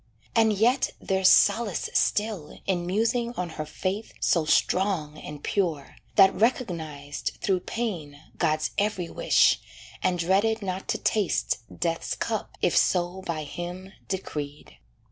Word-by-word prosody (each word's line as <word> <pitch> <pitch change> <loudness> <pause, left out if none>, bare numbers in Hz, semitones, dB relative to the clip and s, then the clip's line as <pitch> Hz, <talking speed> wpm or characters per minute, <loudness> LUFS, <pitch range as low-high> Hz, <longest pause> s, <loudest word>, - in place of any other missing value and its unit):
And 225 -1 +5
yet 235 +6 +2
there's 190 -1 +3
solace 205 -2 +4
still 205 -8 0
In 175 -3 -1
musing 230 +5 0
on 180 -3 -3
her 155 -1 -6
faith 195 +7 -3
so 165 -3 +2
strong 155 0 +1
and 145 -1 -9
pure, 165 -8 -1 0.2
That 195 -2 +7
recognized, 155 - -1
through 190 -2 +1
pain, 175 -10 -4 0.2
God's 155 -2 +1
every 200 -4 -1
wish, - - +4 0.4
And 180 -1 +1
dreaded 200 +6 +2
not 185 0 -4
to - - 0
taste 210 - 0
death's 165 0 -2
cup - - -3
if - - +3
so 180 +1 +2
By 160 -2 -2
Him 175 +5 -7
decreed. 150 -6 -5
185 Hz, 130 wpm, -26 LUFS, 155-205 Hz, 0.4 s, That